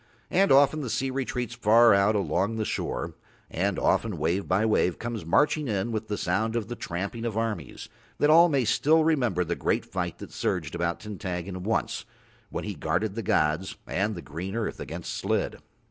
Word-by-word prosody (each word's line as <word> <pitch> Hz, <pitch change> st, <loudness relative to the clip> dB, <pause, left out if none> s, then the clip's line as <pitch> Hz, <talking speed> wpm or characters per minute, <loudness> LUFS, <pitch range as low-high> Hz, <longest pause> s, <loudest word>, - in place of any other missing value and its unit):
And 195 Hz, +1 st, +3 dB
often 140 Hz, +3 st, +5 dB
the 130 Hz, -, -4 dB
sea 135 Hz, +3 st, -1 dB
retreats 125 Hz, -2 st, -3 dB
far 115 Hz, -1 st, +5 dB
out 100 Hz, +2 st, +3 dB
along 100 Hz, +1 st, 0 dB
the 110 Hz, -1 st, -1 dB
shore, -, -, -3 dB, 0.4 s
and 95 Hz, +2 st, 0 dB
often 110 Hz, -6 st, +1 dB
wave 85 Hz, +6 st, 0 dB
by 95 Hz, +4 st, +2 dB
wave 90 Hz, -5 st, +2 dB
comes 115 Hz, -7 st, -5 dB
marching 150 Hz, -, +2 dB
in 105 Hz, 0 st, -1 dB
with 110 Hz, 0 st, -3 dB
the 105 Hz, -1 st, -2 dB
sound 110 Hz, +6 st, 0 dB
of 115 Hz, -2 st, -2 dB
the 120 Hz, -, -4 dB
tramping 100 Hz, +5 st, -4 dB
of 115 Hz, -2 st, -2 dB
armies, 115 Hz, -2 st, -3 dB, 0.3 s
that 145 Hz, -, +4 dB
all 170 Hz, +2 st, +7 dB
may 135 Hz, -5 st, +1 dB
still 155 Hz, +8 st, +3 dB
remember 125 Hz, -, +2 dB
the 85 Hz, 0 st, -2 dB
great -, -, 0 dB
fight -, -, -3 dB
that -, -, -10 dB
surged -, -, -2 dB
about 85 Hz, 0 st, -1 dB
Tintaggon 95 Hz, -3 st, -5 dB
once, 110 Hz, +5 st, -1 dB, 0.5 s
when -, -, -4 dB
he -, -, -4 dB
guarded 90 Hz, +6 st, -1 dB
the 115 Hz, -, -3 dB
gods 80 Hz, -2 st, +1 dB
and 105 Hz, +3 st, -1 dB
the 85 Hz, -, -7 dB
green 90 Hz, +7 st, -6 dB
earth 115 Hz, -2 st, -3 dB
against -, -, -5 dB
Slid. -, -, -1 dB
110 Hz, 190 wpm, -27 LUFS, 95-120 Hz, 0.5 s, all